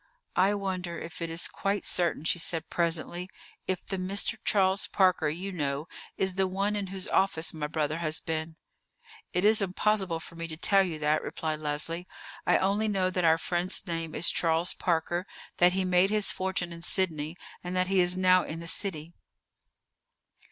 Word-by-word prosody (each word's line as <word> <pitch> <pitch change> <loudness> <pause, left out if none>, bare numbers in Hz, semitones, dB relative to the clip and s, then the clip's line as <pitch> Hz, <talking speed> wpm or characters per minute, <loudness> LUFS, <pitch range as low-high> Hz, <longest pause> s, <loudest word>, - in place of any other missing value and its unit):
"I 195 +2 +3
wonder 185 -3 -3
if 165 +1 -8
it 165 - -2
is 165 +1 0
quite 200 +1 -2
certain," 170 -4 0
she 175 - +1
said 165 -1 -1
presently, 170 +2 -1 0.4
"if 185 -1 -2
the 195 - -3
Mr. 195 +4 +1
Charles 195 0 +3
Parker 185 -5 +3
you 180 +6 -4
know 145 -3 -2 0.3
is 190 -1 +1
the 190 0 +1
one 200 +3 -1
in 200 -2 -2
whose 190 0 -5
office 165 -4 +1
my 150 -2 -3
brother 155 0 -1
has 155 -2 0
been?" 160 0 -4 0.8
"It 180 +2 +1
is 215 0 +6
impossible 190 -2 +1
for 165 - -11
me 165 0 -5
to 160 -1 -6
tell 195 +4 +4
you 175 -5 -2
that," 150 0 +1
replied 155 -1 -3
Leslie. 155 +4 -3 0.4
"I - - +5
only 200 +3 +1
know 190 -3 +1
that 180 -1 -1
our 160 0 +5
friend's 175 +2 0
name 165 -2 -4
is 170 - +4
Charles 165 +1 +2
Parker, 175 +1 -1 0.3
that 180 0 +5
he 190 0 0
made 180 +1 +4
his 210 -1 +2
fortune 185 -2 -2
in 170 - -10
Sydney, 165 -3 -1 0.3
and 180 +1 -4
that 185 0 +2
he 190 +1 +1
is 180 0 +3
now 185 0 +5
in 160 - -6
the 170 - -8
city." 165 -3 -2
180 Hz, 185 wpm, -28 LUFS, 165-190 Hz, 0.8 s, is